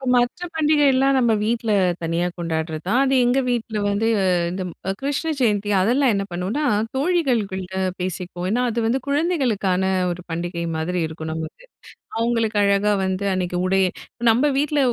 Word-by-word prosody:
மற்ற 245 +8 +1
பண்டிகைலாம் 280 -3 +3
நம்ம 240 -3 +3
வீட்ல, 225 0 0 0.3
தனியா 165 +2 0
கொண்டாடுறது 160 -2 -3
தான். 245 +6 +3
அது 270 0 +2
எங்க 250 +2 +3
வீட்ல 225 -3 -2
வந்து 210 +3 0 0.4
இந்த 185 +1 -4 0.4
கிருஷ்ண 285 +4 -1
ஜெயந்தி 210 -4 +1
அதெல்லாம் 250 +5 +3
என்ன 200 0 0
பண்ணுவோம்னா, 190 +12 -2 0.3
தோழிகள்குள்ள 250 - 0 0.3
பேசிக்குவோம். 180 0 -4
ஏன்னா, 245 +2 +1
அது 235 +1 -2
வந்து 250 +4 +1
குழந்தைகளுக்கான 260 - +1 0.3
ஒரு 175 +1 -6
பண்டிகை 170 +1 -3
மாதிரி 175 +3 -2
இருக்கணுமுட்டு. 160 - -6 0.5
அவங்களுக்கு 230 -2 0
அழகா 200 +1 +3
வந்து 190 +1 -2
அன்னிக்கு 180 -1 -2
உடைய 190 +1 +3 0.5
நம்ம 245 +6 +3
வீட்ல 295 +1 +1
215 Hz, 135 wpm, -22 LUFS, 180-265 Hz, 0.5 s, பண்டிகைலாம்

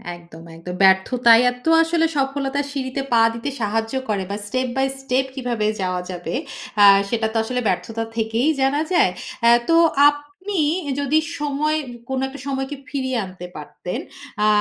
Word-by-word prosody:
একদম, 170 -1 -14
একদম। 180 +2 -7
ব্যর্থতাই 230 +5 +5
এতো 250 +6 -4
আসলে 330 0 +1
সফলতার 275 +1 -1
সিঁড়িতে 270 -1 -3
পা 230 - +5
দিতে 230 +5 -4
সাহায্য 225 +2 -1 0.2
করে। 200 -2 0
বা - - -2
step 255 +4 -1
by 265 - +3
step 265 0 0
কিভাবে 240 -5 -2 0.2
যাওয়া 185 -1 -1
যাবে 175 -2 -5 0.5
আ - - +10 0.2
সেটা 225 -2 0
তো 230 - 0
আসলে 250 +2 -2
ব্যর্থতা 225 +5 -2
থেকেই 225 +6 0
জানা 275 +3 +2
যায়। 350 - +4 0.4
আ - - +8 0.2
তো 330 - +5 0.3
আপনি 290 +7 -5 0.3
ই - - 0
যদি 290 +3 +2 0.2
সময় 300 +1 0 0.3
কোন 265 - -1
একটা 275 +1 -10
সময়কে 270 +1 -3
ফিরিয়ে 260 -3 -2
আনতে 185 -1 -10
পারতেন। - - -6 0.5
আ - - +4
255 Hz, 160 wpm, -21 LUFS, 220-280 Hz, 0.5 s, আ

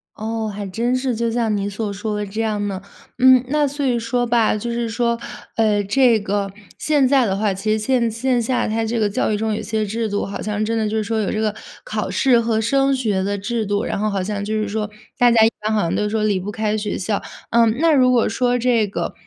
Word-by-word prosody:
哦， 220 0 -3
还 205 -1 -5
真 235 +6 -1
是， 255 -1 -1
就 230 +1 -1
像 225 -2 0
你 200 0 -2
所 205 0 -4
说 210 +1 -3
的 210 - -2
这 210 +3 -4
样 210 -2 -1
呢。 195 -1 -4 0.4
嗯， 255 -1 +6
那 295 0 +2
所 285 +1 -3
以 245 -3 +1
说 245 +2 -1
吧， 235 -2 +2
就 235 +3 -4
是 235 0 -2
说， 235 +1 0 0.4
呃， 210 -2 +2
这 230 +3 +3
个 200 -1 -2 0.3
现 290 -4 +2
在 265 -1 +4
的 190 - 0
话， 205 -1 +1
其 195 +3 -2
实 215 - +2
线 235 +2 +1
线 240 +2 0
下 245 +2 0
它 225 +1 -1
这 230 +1 -1
个 215 - +2
教 205 - 0
育 210 - 0
中， 220 0 -1
有 210 - -3
些 215 0 -2
制 220 +2 -2
度 205 0 -1
好 200 - -6
像 210 0 -2
真 230 +1 -1
的 220 -2 0
就 220 - -1
是 215 - 0
说， 225 +1 -1
有 200 - -1
这 215 - -2
个 215 -1 0 0.3
考 215 -2 -3
试 240 +6 +3
和 225 -1 0
升 275 +4 +2
学 215 -7 0
的 200 +1 -1
制 225 +3 -2
度， 205 +1 -1
然 - - -2
后 215 +1 0
好 195 -2 -1
像 200 +1 -3
就 215 +2 -2
是 215 -1 -1
说， 210 +1 -3 0.3
大 245 -1 +6
家 225 -1 +6
一 225 - +3
般 215 +1 -1
好 215 -1 +2
像 170 - -1
都 210 0 0
说 215 0 -1
离 205 -3 +1
不 195 +3 -5
开 215 0 -1
学 210 -1 -2
校。 200 +2 -2 0.3
嗯， 230 -1 +4
那 330 +1 +4
如 255 -3 +4
果 245 -2 +3
说 245 +2 +1
这 235 -3 +2
个， 195 - -4
220 Hz, 275 characters per minute, -20 LUFS, 210-235 Hz, 0.4 s, 嗯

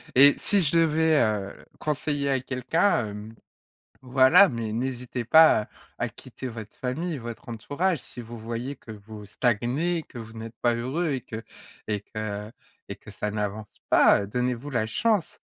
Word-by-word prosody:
Et 140 +2 +8
si 200 -2 +2
je 145 - +1
devais, 160 -1 +3
heu, 105 -3 -3
conseiller 145 -1 -1
à 135 - +2
quelqu'un, 130 - +1
hem, 105 +2 -8 0.7
voilà, 130 +9 +6
mais 115 -4 -4
n'hésitez 125 0 -3
pas, 160 -3 +7
heu, - - -19 0.3
à - - -1
quitter 130 - -10
votre 110 -3 -9
famille, 150 +5 -3
votre 120 0 -8
entourage 145 - -1
si 125 - -10
vous 120 0 -9
voyez 115 +5 -5
que 115 - -14
vous 105 0 -11
stagnez, 125 - 0
que 120 - -11
vous 110 -1 -9
n'êtes 115 0 -8
pas 120 -1 +3
heureux 140 +8 -1
et 130 - -2
que 115 -2 -7 0.4
et 105 -1 -1
que 105 0 -5 0.4
et - - -5
que - - -13
ça 105 - -3
n'avance 105 0 -4
pas, 100 - +6
heu, - - -5
donnez-vous 125 +5 -2
la 115 -4 0
chance. 210 - 0
125 Hz, 170 wpm, -26 LUFS, 110-145 Hz, 0.7 s, Et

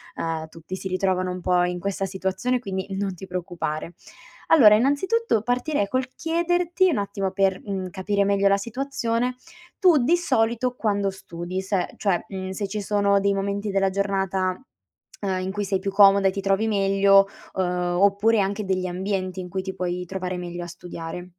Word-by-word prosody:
uhm, 160 -1 -3
tutti 165 +3 -8
si 190 - -5
ritrovano 185 -1 0
un 180 - -6
po' 180 0 +2
in 180 0 -1
questa 195 +1 -2
situazione, 190 +6 -1
quindi 190 -5 -4
non 195 -1 -2
ti 190 - -9
preoccupare. 175 -3 -4 0.6
Allora 225 -10 +8
innanzitutto 285 - +2
partirei 245 -2 0
col 255 +3 -1
chiederti, 345 +2 +1
un 270 - 0
attimo, 200 -1 -2
per, 195 -1 +1
mhmm, 190 -2 -3
capire 200 +1 0
meglio 200 0 +3
la 200 - +4
situazione, 245 +1 -2 0.4
tu 345 - +5
di 325 +8 +4
solito 250 -5 0
quando 205 -4 0
studi. 185 -1 -6
Se 190 -1 -2
cioè, 195 -4 +1
mhmm, 190 -1 -5
se 200 +2 -3
ci 210 +2 -4
sono 200 -1 +2
dei 200 0 +2
momenti 200 +1 -2
della 195 0 +2
giornata, 190 -1 -1 0.6
uhm, 190 -2 -1
in 190 +1 -3
cui 205 0 -2
sei 195 0 0
più 195 0 -3
comoda 195 -1 +6
e - - +2
ti 195 - -3
trovi 195 +2 +1
meglio, 195 -1 +4 0.3
uhm, 190 - 0 0.4
oppure 200 +2 +4
anche 200 +2 -1
degli 185 -1 -1
ambienti 185 0 -3
in 180 - -6
cui 190 +2 -3
ti 190 0 -5
puoi 180 0 -3
trovare 185 0 -4
meglio 175 0 -5
a - - -7
studiare. 175 0 -7
195 Hz, 180 wpm, -24 LUFS, 185-210 Hz, 0.6 s, Allora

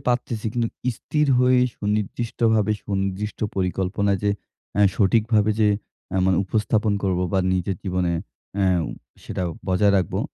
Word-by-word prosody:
কি - - -20
পারতেছি 120 -3 -1
কিন্তু 115 -1 0 0.2
স্থির 150 +5 -1
হয়ে 125 0 +4 0.2
সুনির্দিষ্টভাবে 110 +1 0
সুনির্দিষ্ট 100 +1 -2 0.2
পরিকল্পনায় 95 +2 0
যে 100 - +3 0.5
আ - - +4 0.2
সঠিকভাবে 110 +1 +3
যে 105 - +5 0.5
আ - - +1
মানে 95 - +3
উপস্থাপন 110 +1 +1
করব 95 -3 +1
বা 95 - +3
নিজের 95 +1 -1
জীবনে 90 -2 0 0.4
অ্যা 95 -1 +3 0.6
সেটা - - -3 0.3
বজায় 100 +2 +3
রাখবো। 95 - 0
105 Hz, 135 wpm, -23 LUFS, 95-110 Hz, 0.6 s, যে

